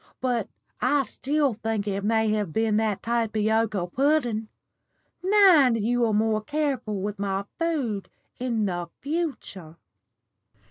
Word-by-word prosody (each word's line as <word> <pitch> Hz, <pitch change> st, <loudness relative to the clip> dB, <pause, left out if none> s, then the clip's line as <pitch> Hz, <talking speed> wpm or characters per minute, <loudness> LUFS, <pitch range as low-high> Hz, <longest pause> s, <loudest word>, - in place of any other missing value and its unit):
But 240 Hz, -5 st, -1 dB, 0.3 s
I 290 Hz, -1 st, +3 dB
still 280 Hz, +3 st, 0 dB
think 220 Hz, -1 st, -3 dB
it 200 Hz, 0 st, -2 dB
may 220 Hz, +1 st, +2 dB
have 210 Hz, -5 st, -1 dB
been 220 Hz, +2 st, +1 dB
that 215 Hz, -3 st, 0 dB
tapioca 220 Hz, -3 st, 0 dB
pudden. 240 Hz, -, 0 dB, 0.7 s
Mind 360 Hz, -, +5 dB
you 235 Hz, +2 st, +1 dB
are -, -, 0 dB
more 215 Hz, 0 st, +1 dB
careful 275 Hz, -6 st, -2 dB
with 205 Hz, 0 st, -4 dB
my 195 Hz, 0 st, -2 dB
food 275 Hz, -, -1 dB, 0.3 s
in 235 Hz, -4 st, 0 dB
the 175 Hz, -3 st, -3 dB
future." 275 Hz, -, -4 dB
225 Hz, 125 wpm, -25 LUFS, 210-270 Hz, 0.7 s, Mind